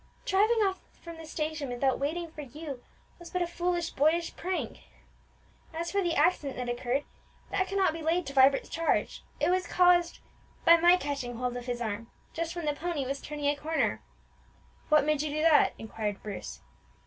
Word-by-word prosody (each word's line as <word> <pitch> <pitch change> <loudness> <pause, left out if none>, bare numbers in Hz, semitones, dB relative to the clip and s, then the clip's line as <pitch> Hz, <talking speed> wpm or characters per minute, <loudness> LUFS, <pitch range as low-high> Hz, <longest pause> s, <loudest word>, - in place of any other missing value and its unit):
"Driving 430 +3 +3
off 380 -1 0 0.2
from 335 -1 -9
the 325 -1 -10
station 310 -3 -3
without 250 +2 0
waiting 320 +4 -2
for 305 - -8
you 280 -1 -8 0.4
was 345 - -10
but 365 -1 0
a - - 0
foolish, 345 0 -1
boyish 320 +4 +1
prank," 370 +1 -2
pleaded - - -17
Emmie. 320 - -17
"As 340 0 -3
for 400 - +1
the 345 -3 0
accident 295 -3 +2
that 250 -1 -3
occurred, 245 +3 -1 0.5
that 380 -1 +1
cannot 390 -3 +2
be 325 - -6
laid 330 +2 +1
to 275 - -6
Vibert's 270 0 +5
charge; 330 0 -1 0.2
it - - +2
was 365 -1 +1
caused 355 -1 +4 0.5
by 335 0 +9
my 350 +2 +6
catching 280 -6 -4
hold 250 +1 -2
of 245 0 -6
his 245 -1 -3
arm 230 +1 -4 0.2
just 335 +1 -3
when 345 -2 -4
the 295 - +1
pony 315 -2 -3
was 275 +2 -3
turning 295 -1 -5
a 290 +1 +3
corner." 315 +2 -1 0.9
"What 305 -2 +5
made 305 -1 +1
you 305 - -2
do 305 +1 -1
that?" 320 -2 +5
inquired 215 -2 -4
Bruce. 190 - -7
310 Hz, 195 wpm, -29 LUFS, 275-345 Hz, 0.9 s, by